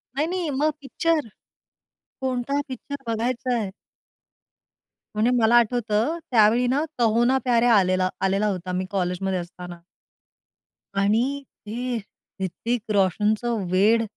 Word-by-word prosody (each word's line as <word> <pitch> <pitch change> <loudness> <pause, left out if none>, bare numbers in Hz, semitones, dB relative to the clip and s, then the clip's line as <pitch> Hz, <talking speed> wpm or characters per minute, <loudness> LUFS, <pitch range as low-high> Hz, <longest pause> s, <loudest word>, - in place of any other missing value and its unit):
नाही 300 +3 +1
नाही 355 -2 -2
मग 305 +1 +3
पिक्चर. 305 0 0 0.9
कोणता 260 +2 -1
पिक्चर 270 +2 -7
बघायच 235 +2 -1
आहे? 215 -5 -1 1.5
म्हणजे 220 +3 +2
मला 230 0 +4
आठवतं 235 +4 +1
त्यावेळी 230 +1 +5
ना 290 +3 +1 0.2
कहो 230 0 +3
ना 260 +2 +3
प्यार 240 -3 +3
है. 245 - +4
आलेला 185 -4 +3 0.2
आलेला 195 +2 +1
होता 185 -2 -3
मी 185 +1 -1
कॉलेजमध्ये 185 0 -1
असताना. 175 0 -9 1.2
आणि 205 +3 +3 0.5
हे 245 +3 -2 0.4
ऋतिक 220 +5 -2
रोशनचं 210 +3 +1
वेड. 215 +5 +4
225 Hz, 120 wpm, -24 LUFS, 195-250 Hz, 1.5 s, त्यावेळी